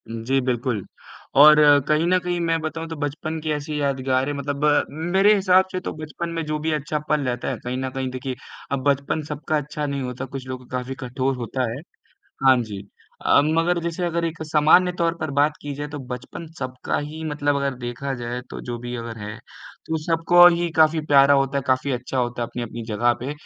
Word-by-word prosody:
उ, - - -7
जी, 135 +2 +2
बिल्कुल 125 -4 -1 0.6
और 150 +1 +10 0.3
कहीं 155 +2 +2
न 185 +1 +4
कहीं 175 -1 -2
मैं 165 0 +1
बताऊँ 165 +1 -4
तो 165 - -5
बचपन 155 +2 -3
की 155 0 -2
ऐसी 150 0 -3
यादगारें 135 0 0
मतलब 140 +1 -2 0.5
मेरे 200 +2 +6
हिसाब 190 -1 +4
से 185 - -2
तो - - -5
बचपन 155 +2 -5
में 165 - -1
जो 150 0 -2
भी 160 +1 -1
अच्छा 150 0 -1
पल 150 -1 +2
रहता 125 -1 -2
है, - - -3
कहीं 125 +1 -3
न 130 0 -2
कहीं 130 0 -3
देखिए, 130 0 -4 0.4
अब 135 -2 -1
बचपन 140 +3 0
सबका 150 +1 -1
अच्छा 150 +1 -4
नहीं 140 -1 -2
होता, 125 0 -4
कुछ 130 0 -8
लोग 130 -1 -7
का 130 - -2
काफ़ी 125 +1 -5
कठोर 130 +2 -1
होता 125 0 -2
है। 130 +5 -6 0.7
हाँ 130 -1 +7
जी 105 -3 -7 0.4
अ, - - +6
मगर 165 +3 +2
जैसे 170 +1 -2
अगर 170 0 -1
एक 165 -1 -3
सामान्य 155 +4 +4
तौर 170 0 +1
पर 155 - -2
बात 150 +1 +3
की 145 - -4
जाए 145 +1 -5
तो 145 - -4
बचपन 125 +6 -7
सबका 130 -1 -3
ही 150 +2 -6
मतलब 145 -2 0
अगर 140 -1 -1
देखा 120 +3 -4
जाए, 120 +1 -4
तो - - -6
जो 120 -1 -5
भी 120 +1 -6
अगर 115 -1 -6
है 105 0 -6 0.5
तो 160 - -1
सबको 170 +2 +6
ही 170 0 -1
काफ़ी 160 0 +4
प्यारा 140 -1 +6
होता 135 0 +1
है, - - -3
काफ़ी 130 +2 +1
अच्छा 125 +1 -3
होता 120 -1 -1
है - - -1
अपनी-अपनी 120 -1 -6
जगह 120 +3 +2
पे। 130 +4 -3
140 Hz, 215 wpm, -23 LUFS, 130-155 Hz, 0.7 s, और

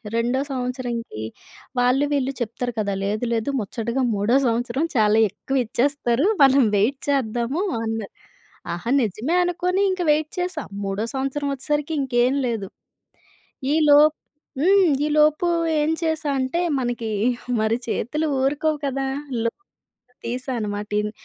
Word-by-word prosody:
రెండో 240 +3 +1
సంవత్సరంకి 245 - -4 0.6
వాళ్ళు 255 +3 +3
వీళ్ళు 275 -1 +1
చెప్తారు 240 +1 -3
కదా! 200 -2 0
లేదు 210 +4 -1
లేదు, 230 +4 -1
ముచ్చటగా 230 +5 -2
మూడో 205 +6 +2
సంవత్సరం 240 +4 0
చాలా 215 -1 +4
ఎక్కువ 260 +6 -2
ఇచ్చేస్తారు. 260 +2 +1 0.2
మనం 270 -2 +6
వెయిట్ 235 +7 +2
చేద్దాము 255 - 0 0.2
అన్నారు. 225 -2 -4 0.6
ఆహా! 175 +7 -5
నిజమే 230 - -1
అనుకోని 360 +2 0
ఇంక 370 -1 -2
వెయిట్ 305 +1 0
చేశా. 360 +1 -2 0.2
మూడో 195 +2 -2
సంవత్సరం 275 +2 -2
వచ్చేసరికి 295 +3 -2
ఇంకేం 250 0 +2
లేదు. 220 -5 -2 1.1
ఈ - - +3
లో 290 0 +8 0.6
హ్మ్, 380 +2 +5 0.2
ఈ - - 0
లోపు 305 +3 +4 0.3
ఏం 305 - +1
చేశా 315 -2 0
అంటే, 260 +6 -1 0.2
మనకి 240 -2 -2 0.5
మరి 220 +2 +1
చేతులు 300 +8 -1
ఊరుకోవు 295 +3 +1
కదా! 270 0 -2 0.4
లోన్ 230 +11 -2 0.7
తీశాను 250 0 -3
అనమాట. 205 0 -4
ఇన్ 210 - -3
255 Hz, 130 wpm, -23 LUFS, 225-290 Hz, 1.1 s, లో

